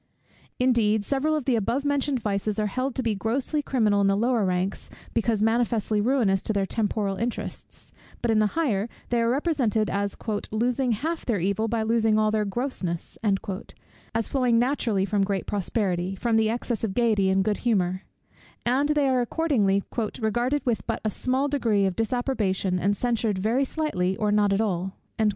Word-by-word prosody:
Indeed, 220 -4 +2
several 285 +5 +1
of 300 -5 -2
the 260 - +2
above 235 +6 -1
mentioned 285 -2 +1
vices 205 0 -1
are 215 - +1
held 255 +5 -2
to 260 - -1
be 225 -2 +1
grossly 250 +9 -1
criminal 215 -8 +2
in 200 - +3
the 195 0 +2
lower 235 0 +2
ranks, 185 +1 -2 0.2
because 225 -2 +1
manifestly 225 -2 +1
ruinous 215 -5 +2
to 220 - -2
their 200 -1 +1
temporal 205 -2 -1
interests: 235 +2 -5 0.3
but 235 - 0
in 220 - +3
the 215 - +4
higher, 230 -9 +1 0.2
they 240 -1 +2
are 230 - +2
represented 255 - +1
as 200 0 -2 0.3
"losing 245 +3 +1
half 320 +9 -3
their 225 -5 0
evil 200 +5 0
by 225 0 0
losing 225 -1 +2
all 215 0 +3
their 215 -1 +1
grossness," 200 -6 -3 1.0
as 225 -1 0
flowing 250 -4 +2
naturally 235 -6 +1
from 205 0 0
great 195 -1 -1
prosperity, 190 -2 -1
from 230 +4 0
the 220 -1 +3
excess 235 -1 -2
of 200 -4 -2
gaiety 220 -5 +2
and 190 0 +3
good 210 +1 0
humour; 185 -6 0 0.6
and 265 +5 +2
they 295 -2 +2
are 255 -1 +2
accordingly 235 -8 +1 0.4
"regarded 240 +6 0
with 225 -7 0
but 225 - -1
a 215 - +1
small 260 +6 0
degree 230 -8 +1
of 190 -2 -1
disapprobation, 215 -6 0
and 200 +2 +1
censured 230 -4 0
very 225 +8 +1
slightly 255 - -1
or 210 -1 +1
not 205 -1 +3
at 195 +2 +2
all." 190 -3 -1
220 Hz, 180 wpm, -25 LUFS, 200-250 Hz, 1.0 s, the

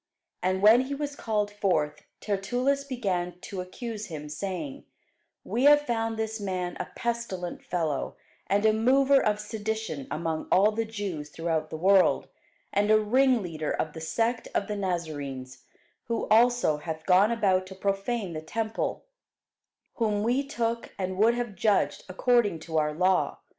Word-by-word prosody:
And 185 +1 0
when 220 +4 +8
he 280 +2 -3
was 290 0 -4
called 210 -5 -1
forth, 160 -8 -1 0.2
Tertullus 245 +8 0
began 190 -10 -2
to 190 -2 -5
accuse 215 +3 -6
him, 150 -4 -7
saying, 200 - -5 0.6
We 245 +4 0
have 290 0 +8
found 225 -4 -2
this 220 0 -3
man 185 -3 -3
a - - -3
pestilent 230 -7 -3
fellow, 160 -6 -2 0.3
and 205 +2 +2
a 215 - +5
mover 270 +5 +4
of 210 0 +1
sedition 220 - -4
among 160 0 -3
all 205 +3 +5
the 225 +1 -1
Jews 200 -9 -5
throughout 160 -1 -2
the 160 - -5
world, 190 +3 +4 0.4
and 205 +1 +2
a 215 0 +6
ringleader 215 - +1
of 155 - -2
the 160 - -8
sect 230 +8 -1
of 200 - +1
the 210 - -3
Nazarenes: 145 -9 -4 0.4
who 230 0 -2
also 235 -7 +4
hath 160 +1 -6
gone 190 +3 +5
about 190 -5 +1
to 190 - -10
profane 195 0 -2
the 155 - -4
temple: 220 +7 -3 0.9
whom 210 -3 +1
we 245 +5 +1
took, 235 -4 -3
and 185 0 -3
would 230 +3 +5
have 240 -3 -3
judged 205 +2 +1
according 210 -1 +2
to 160 0 -1
our 150 0 +1
law. 180 +4 +1
205 Hz, 155 wpm, -27 LUFS, 175-230 Hz, 0.9 s, when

